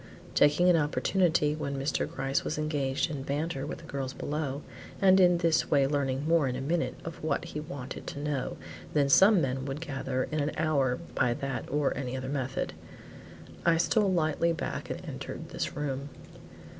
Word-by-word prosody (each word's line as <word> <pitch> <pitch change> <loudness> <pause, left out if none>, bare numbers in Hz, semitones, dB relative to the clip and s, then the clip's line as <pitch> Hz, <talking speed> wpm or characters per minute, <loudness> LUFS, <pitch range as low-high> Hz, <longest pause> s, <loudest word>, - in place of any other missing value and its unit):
Taking 150 +5 +4
an 180 - +6
opportunity 155 0 +2
when 140 -2 -3
Mr. 135 +2 -1
Gryce 135 +1 -1
was 155 - -3
engaged 145 -1 0
in 145 -3 -4
banter 145 +1 -2
with - - -5
the - - -14
girls 135 -1 -4
below, 145 -1 -3 0.4
and 190 -1 +6
in 180 -1 +6
this 165 -2 +2
way 140 -2 +4
learning 140 0 0
more 165 -4 +4
in 125 - -2
a - - -3
minute 160 +5 -1
of 165 -2 -7
what 155 -2 0
he 150 - -5
wanted 140 -3 -7
to 140 - -5
know 145 -3 -2 0.4
than 145 -2 +3
some 195 +7 +7
men 130 -1 -1
would 140 +1 -4
gather 135 -4 -2
in 155 - 0
an 145 +1 0
hour 140 -5 +2 0.2
by 120 -2 +2
that 140 -3 -4
or 145 0 +1
any 130 -1 -3
other 130 0 -4
method, 130 -2 -2 0.9
I 170 -1 +4
stole 200 +4 +3
lightly 165 -1 +2
back 165 - -4
and - - -5
entered - - -6
this - - -3
room. 140 -1 -3
145 Hz, 180 wpm, -29 LUFS, 135-160 Hz, 0.9 s, some